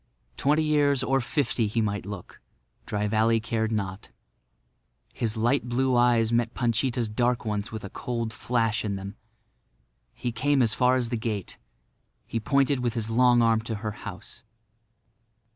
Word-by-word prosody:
Twenty 150 - +2
years 145 -3 +2
or 135 0 +2
fifty 120 -2 0
he 110 +3 -1
might 105 -3 -1
look; 100 -3 -9 0.5
Dry 105 0 -1
Valley 110 +2 +3
cared 110 0 -1
not. 100 -3 -3 1.0
His 115 -1 -1
light 120 +3 +1
blue 130 +1 +1
eyes 120 -2 +3
met 115 0 +1
Panchita's 120 0 0
dark 120 +3 0
ones 105 -1 -2
with 110 -1 -6
a 100 - -6
cold 115 -2 -3
flash 115 0 0
in 100 -2 -2
them. 100 +1 -7 1.0
He 120 - -3
came 135 +3 +2
as 110 - +2
far 125 0 +3
as 125 -2 0
the 120 - -1
gate. 110 -4 -3 0.7
He 115 - -3
pointed 140 +3 +2
with 120 -1 -1
his 115 -1 -2
long 120 0 +5
arm 115 -1 +3
to 115 0 -4
her 105 - -1
house. 105 +3 -9
115 Hz, 160 wpm, -26 LUFS, 110-125 Hz, 1.0 s, long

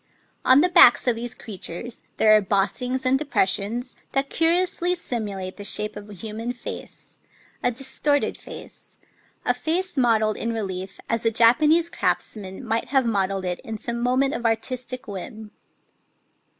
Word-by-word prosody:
On 260 +3 +6
the 360 - +3
backs 250 -8 +7
of 245 -2 +2
these 235 0 -5
crea 200 -4 -8
tures 220 +9 -5 0.2
there 215 0 +6
are 215 - +5
bossings 245 +7 -1
and 260 +1 +3
depressions 240 -2 0 0.2
that 275 0 0
curi 335 +3 +3
ously 360 0 0
simulate 205 - -4
the 205 - -8
shape 210 +1 +2
of 205 0 -9
a - - -9
human 220 +5 -5
face, 245 - -9 0.2
— - - -32
a - - +4
distorted 270 +4 0
face, - - -12 0.2
— - - -37
a - - +3
face 360 +3 -1
modelled 220 -4 +2
in 230 0 -2
relief 190 -3 -5
as 230 0 -1
a 225 - +3
Japanese 300 +9 +4
craftsman 195 +2 -3
might 225 0 0
have 270 -2 +1
modelled 195 -3 0
it 180 -1 -2
in 220 -1 -6
some 235 +2 -4
moment 260 +3 +2
of - - -4
artistic 250 +2 -2
whim. 210 +2 -8
230 Hz, 165 wpm, -24 LUFS, 210-260 Hz, 0.2 s, backs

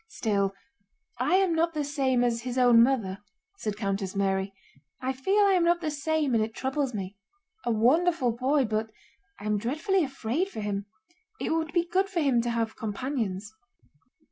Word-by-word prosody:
"Still, 200 - -1 0.6
I - - +2
am 380 -3 +3
not 330 0 +1
the 300 - 0
same 270 -3 +1
as 235 -1 0
his 250 +1 -4
own 245 -2 +6
mother," 225 -7 +1 0.4
said 210 -2 -3
Countess 195 -2 -2
Mary. 195 0 0 0.5
"I 260 +1 -2
feel 385 +11 +2
I 395 - +4
am 360 -2 +3
not 345 0 +3
the 315 -3 -2
same 295 -1 0
and 225 -2 +3
it 220 +1 -5
troubles 265 0 -1
me. 195 0 -5 0.5
A 240 - +1
wonderful 265 +4 +3
boy, 260 +4 +1
but 220 0 -1 0.5
I - - -9
am 210 -1 +1
dreadfully 315 - 0
afraid 275 - -2
for 220 - -7
him. 205 -1 -3 0.5
It - - -2
would 320 -1 0
be 345 +1 +1
good 380 +3 +1
for 380 -4 -1
him 270 -6 +3
to 240 - -2
have 230 -1 -1
companions." 215 -3 -3
250 Hz, 180 wpm, -27 LUFS, 215-315 Hz, 0.6 s, own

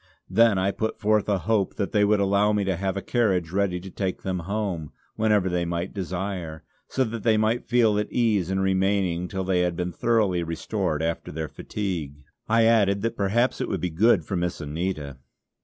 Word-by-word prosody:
Then 115 -3 +5
I 95 +1 +1
put 110 +2 -3
forth 105 -1 +2
a 100 - +2
hope 105 0 0
that 100 - -2
they 105 -1 +3
would 105 0 +3
allow 100 +1 +3
me 105 -1 +1
to 95 -2 0
have 95 +2 -2
a 100 - -4
carriage 95 -9 +1
ready 95 -2 0
to 95 +1 -9
take 95 -1 -3
them 95 -1 -2
home, 95 -8 -2 0.2
whenever 105 -3 +2
they 90 -1 0
might 85 +1 -3
desire, 90 -4 -4 0.2
so 135 - 0
that 115 -2 -4
they 110 0 +3
might 110 +2 0
feel 115 -4 +3
at 105 - -3
ease 105 -7 +1
in 95 0 0
remaining 95 -2 +1
till 95 0 -3
they 95 -1 +1
had 90 -1 0
been 90 +1 -2
thoroughly 105 -5 +1
restored 80 -2 -2
after 85 0 -3
their 80 +1 -4
fatigue. 80 -10 -5 0.3
I 115 0 +4
added 100 -3 +3
that 115 - -1
perhaps 110 +6 +1
it - - -2
would - - -2
be 90 - -1
good 95 0 +3
for 95 - -3
Miss 85 -1 -2
Anita. 75 -3 -4
95 Hz, 205 wpm, -25 LUFS, 90-105 Hz, 0.3 s, Then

